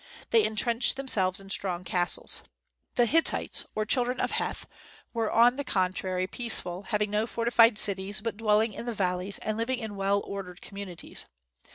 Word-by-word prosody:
They 455 -2 +5
entrenched 235 - +2
themselves 195 -9 +3
in 195 0 -8
strong 180 -2 -1
castles. 175 0 +2 0.5
The 240 - +4
Hittites, 325 +7 +2
or 215 - -1
children 250 +2 0
of - - -1
Heth, - - -2 0.5
were 225 -2 -1
on 240 +3 +4
the 285 - -2
contrary 185 -4 -1
peaceful, 185 -4 -1
having 210 -2 0
no 210 +2 0
fortified 230 -1 +3
cities, 200 0 +3
but 225 0 -4
dwelling 215 0 +2
in 235 - -8
the 235 - -3
valleys, 185 0 -1
and 215 +1 -3
living 255 +3 -1
in 220 -4 -6
well 200 +1 +1
ordered 190 -2 -7
communities. 200 -4 -8
210 Hz, 165 wpm, -27 LUFS, 190-235 Hz, 0.5 s, They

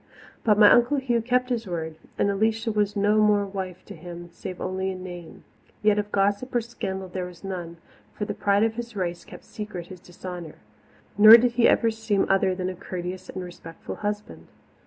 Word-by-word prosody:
But 210 -2 +4
my 210 -1 +8
Uncle 245 +4 +4
Hugh 245 -4 0
kept 250 +2 +1
his 235 -3 -2
word, 160 -3 -4 0.2
and - - +2
Alicia 220 +3 0
was 210 -1 0
no 205 +1 +3
more 210 -1 +3
wife 190 -2 -6
to - - -9
him, 175 -1 -9
save 180 +1 -8
only 190 +1 -2
in 185 -1 -6
name. 175 -2 -9 0.4
Yet 210 -1 +4
of 205 0 -4
gossip 205 +6 0
or 240 - +3
scandal 190 -5 -5
there 180 0 -4
was 175 0 -14
none, 175 -3 -6 0.3
for 210 - -4
the - - -3
pride 200 +1 +2
of 225 0 +1
his 235 0 -7
race 175 -3 -3
kept - - -13
secret 210 -5 -7
his 185 -2 -10
dishonour, 175 -2 -9 0.6
nor 215 +2 +11
did 240 +1 +2
he 235 0 +4
ever 230 -1 +3
seem 220 -3 0
other 190 -1 +3
than 180 0 -3
a - - -4
courteous 185 0 -6
and 185 - -5
respectful 165 -2 -9
husband. 210 0 -5
200 Hz, 200 wpm, -25 LUFS, 180-220 Hz, 0.6 s, nor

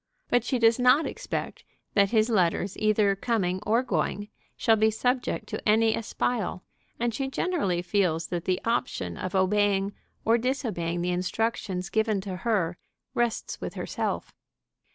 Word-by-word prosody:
But 245 -2 +3
she 255 - 0
does 230 0 +4
not 250 +5 +5
expect - - -4 0.3
that 200 -1 +4
his 220 +1 +2
letters, 185 -1 +1
either 215 -2 +3
coming 195 -4 0
or 230 +4 +3
going, 205 -4 -1 0.3
shall 225 -2 +4
be 220 0 +4
subject 245 +3 -1
to - - -2
any 220 +1 +4
espial, 225 -4 -2 0.4
and 235 -1 0
she 270 +4 -2
generally 265 - 0
feels 175 -4 +1
that 175 -1 -3
the 185 -1 +1
option 230 - -1
of 185 - -4
obeying 200 +1 +2 0.3
or 230 +2 +4
disobeying 220 -10 -1
the 180 - 0
instructions 185 +1 -2
given 220 -2 +1
to 190 -2 -5
her 185 -4 0 0.3
rests 240 -1 -1
with - - -5
herself. - - -3
215 Hz, 150 wpm, -27 LUFS, 185-230 Hz, 0.4 s, not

